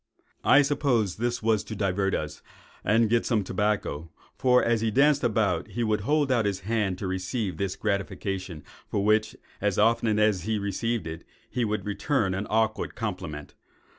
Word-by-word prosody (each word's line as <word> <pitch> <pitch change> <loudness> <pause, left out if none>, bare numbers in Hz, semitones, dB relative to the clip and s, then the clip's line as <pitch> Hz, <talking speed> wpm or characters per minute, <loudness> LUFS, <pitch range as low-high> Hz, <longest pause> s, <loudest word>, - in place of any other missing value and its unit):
"I 145 - +6
suppose 135 -8 +1
this 120 0 -2
was 110 -2 +2
to 110 - -7
divert 95 -1 0
us, 75 -1 -5 0.4
and 110 +2 +3
get 115 +2 +2
some 110 -4 +1
tobacco; 95 -5 -1 0.3
for, 125 -1 +4
as 115 -1 +2
he 115 - +1
danced 140 +5 +3
about, 105 -7 +1
he 120 - -3
would 110 -2 +1
hold 145 +4 +1
out 120 -4 +2
his 100 -2 -1
hand 105 -2 -1
to - - -5
receive 95 0 -2
this 95 0 -2
gratification, 95 -4 -3 0.2
for 100 - -1
which, 110 +1 +2 0.3
as 105 -2 0
often 110 0 +3
as 105 -3 +3
he 110 +5 -1
received 100 +1 -2
it, 80 0 -6 0.3
he 125 - 0
would 105 -1 -2
return 105 -1 0
an 95 +2 -3
awkward 110 0 0
compliment. 90 - -5
105 Hz, 170 wpm, -27 LUFS, 95-115 Hz, 0.4 s, I